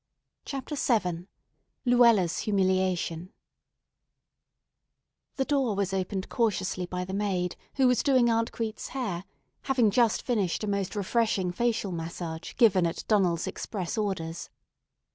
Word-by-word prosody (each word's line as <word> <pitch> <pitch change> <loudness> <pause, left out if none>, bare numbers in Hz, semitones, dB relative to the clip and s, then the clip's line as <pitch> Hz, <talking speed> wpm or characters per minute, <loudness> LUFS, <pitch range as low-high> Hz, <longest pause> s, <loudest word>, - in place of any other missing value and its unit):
CHAPTER 275 +2 -5
VII 180 -10 0 0.6
LUELLA'S 235 -8 +4
HUMILIATION 185 -3 0 2.0
THE 265 - 0
door 270 -7 +1
was 195 -1 -1
opened 190 0 -2
cautiously 190 -6 -1
by 180 0 -3
the 190 - -6
maid, 190 -3 -1 0.2
who 265 -1 +4
was 250 -2 +3
"doing" 260 -4 +4
Aunt 230 0 +1
Crete's 225 -1 -4
hair, 195 -8 -3 0.4
having 250 -6 +3
just 230 0 +2
finished 210 -7 0
a - - -2
most 200 0 -1
refreshing 205 -2 +1
facial 225 0 0
massage 165 -1 -5
given 190 -7 +4
at 165 - -4
Donald's 185 -6 +2
express 185 -6 -4
orders. 175 -6 -3
200 Hz, 125 wpm, -28 LUFS, 180-235 Hz, 2.0 s, LUELLA'S